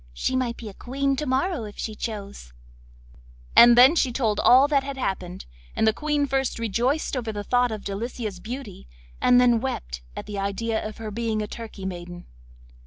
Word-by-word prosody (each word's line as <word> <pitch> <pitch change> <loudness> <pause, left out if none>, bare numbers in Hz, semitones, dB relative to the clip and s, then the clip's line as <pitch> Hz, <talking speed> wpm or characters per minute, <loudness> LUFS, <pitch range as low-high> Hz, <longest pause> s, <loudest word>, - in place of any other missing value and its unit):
She - - -1
might 250 -2 -1
be 230 - -8
a 205 - -8
Queen 275 +5 -1
to 300 +1 -3
morrow 265 - 0
if 205 - -10
she 220 - -4
chose;' 205 - -7 1.0
and 240 0 +9
then 260 +6 +8
she 270 -6 +2
told 225 -4 0
all 260 +3 +6
that 280 -2 +2
had 275 0 -6
happened, 185 -7 -4 0.3
and - - +2
the 220 - +4
Queen 295 +3 0
first 270 -1 -1
rejoiced 240 +8 0
over 235 -3 -3
the 205 -1 -5
thought 245 +2 +2
of 215 -2 -5
Delicia's 215 -1 -5
beauty, 235 - -8 0.3
and 245 0 +5
then 240 -2 +4
wept 60 - -4
at - - -6
the 205 -1 -5
idea 220 +3 -2
of 215 -1 -6
her 220 -1 -6
being 220 0 -2
a - - -5
Turkey 215 -3 -8
maiden. 175 -1 -7
230 Hz, 190 wpm, -24 LUFS, 205-260 Hz, 1.0 s, and